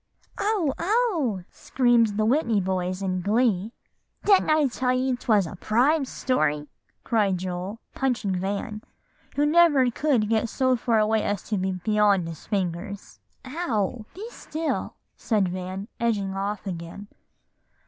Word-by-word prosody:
'" - - -33
"Oh! 400 -9 +1
oh!" 340 - +1
screamed 235 -5 +2
the 215 - +2
Whitney 235 -3 +2
boys 185 0 -2
in 185 -1 -1
glee. 210 0 +1 0.5
"Didn't 395 -5 +5
I 310 -1 +4
tell 250 0 0
you 255 0 +1
'twas 215 -5 +2
a 160 - -7
prime 270 +7 +2
story?" 150 - 0 0.4
cried 205 -5 +1
Joel, 185 +4 -5
punching 245 -7 0
Van, 200 +3 -3 0.5
who 290 - +2
never 295 -5 +5
could 250 -5 +1
get 225 +1 +1
so 260 +2 +2
far 230 -1 +1
away 215 0 +2
as 205 -2 -2
to 215 - 0
be 190 0 -1
beyond 200 -1 +2
his 165 -2 -9
fingers. 195 +1 -3 0.3
"Ow! 245 - -2
Be 405 +4 -7
still!" 320 -7 -3 0.2
said 205 -5 +1
Van, 185 +2 -5
edging 205 -5 0
off 200 +1 -3
again. 180 +2 -6
215 Hz, 140 wpm, -25 LUFS, 195-260 Hz, 0.5 s, Didn't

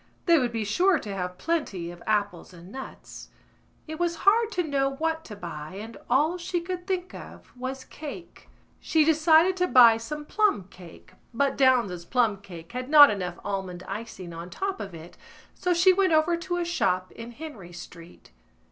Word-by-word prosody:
They 340 -3 +5
would 245 -3 -1
be 225 -2 -2
sure 355 - +3
to 205 -7 -6
have 180 -1 -4
plenty 205 - -2
of 175 0 -13
apples 205 -4 -1
and 175 +2 -13
nuts. 265 +2 -10 0.6
It 315 +1 -7
was 345 -1 0
hard 445 +3 +4
to 360 - 0
know 275 -3 0
what 320 +2 -2
to 210 - -9
buy 170 -3 -8
and 220 +3 -8
all 305 +8 +2
she 350 +1 -2
could 355 +1 -6
think 370 -1 -2
of - - -12
was 260 +1 -5
cake. 310 +5 -10 0.3
She 315 -2 +2
decided 320 +3 +4
to 360 0 +1
buy 235 -7 +7
some 295 +7 -6
plumcake 185 - -2 0.2
but 275 +3 +1
Downes's 235 -10 +2
plumcake 200 -8 -2
had 250 +2 -5
not 290 -1 +9
enough 180 -4 -4
almond 190 -3 -4
icing 195 -4 -7
on 170 +2 -8
top 390 - -4
of 195 -4 -7
it 165 +2 -12 0.4
so 360 - -2
she 355 +2 +5
went 375 -2 +2
over 315 +2 +3
to 350 +1 -3
a 350 - -1
shop 185 - 0
in 235 +1 -10
Henry 235 - -9
Street. 175 - -13
255 Hz, 175 wpm, -26 LUFS, -, 0.6 s, not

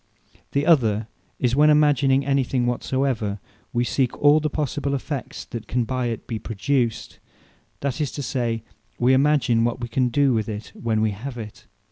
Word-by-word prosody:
The 140 +1 +1
other 115 -10 +3 0.3
is, 125 -1 +1
when 150 +2 +5
imagining 140 -3 +4
any 135 -1 +2
thing 125 -1 -1
whatsoever, 120 -4 -1 0.3
wee 120 0 +1
seek 125 0 0
all 145 +1 +5
the 155 0 -1
possible 140 -1 -2
effects, 140 0 -5
that 115 -2 -7
can 125 0 0
by 125 +1 -2
it 115 -2 -4
be 115 - -4
produced; 115 +2 -2 0.6
that 140 +2 -2
is 145 -5 -1
to 145 - -4
say, 120 -3 -2 0.3
we 125 +2 +3
imagine 135 -4 +3
what 120 +1 0
we 120 - -4
can 125 +1 +1
do 140 +1 +3
with 110 -1 -1
it, 105 0 -6
when 110 -2 -1
wee 110 -1 +2
have 120 +6 -7
it. 105 -3 -9
125 Hz, 180 wpm, -23 LUFS, 115-140 Hz, 0.6 s, when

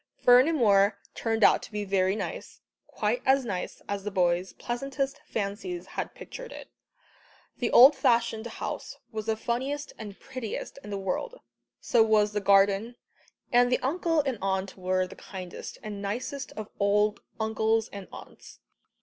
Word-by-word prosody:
Fernimoor 240 -7 +5 0.2
turned 225 -1 -1
out - - +6
to - - -10
be 210 -1 -3
very 190 0 +2
nice, - - -6 0.3
quite - - -1
as 265 -1 +3
nice 185 -5 -4
as 200 -1 -3
the 210 - -2
boys' 180 -1 +1
pleasantest 275 +3 -3
fancies 220 - -4
had - - -5
pictured - - -9
it. - - -10 0.9
The 240 - 0
old 270 +4 +9
fashioned 235 -3 +1
house 235 - -6
was 215 -1 -5
the 220 -1 +1
funniest 265 +6 -3
and 205 -3 -8
prettiest 255 0 -6
in - - -9
the 200 - -3
world, 195 - -3 0.4
so 235 - +3
was 215 -2 +4
the 210 0 -2
garden, 200 +4 +3 0.6
and 245 0 +4
the 250 - +4
uncle 330 +3 +1
and 265 -6 -3
aunt 190 0 -1
were 185 0 0
the 180 - -11
kindest 185 -3 -8
and 205 -2 -6
nicest 250 +7 -4
of 215 -1 -6
old 210 +1 +2 0.2
uncles 220 0 +1
and 200 -2 -7
aunts. - - -12
220 Hz, 155 wpm, -28 LUFS, 200-255 Hz, 0.9 s, old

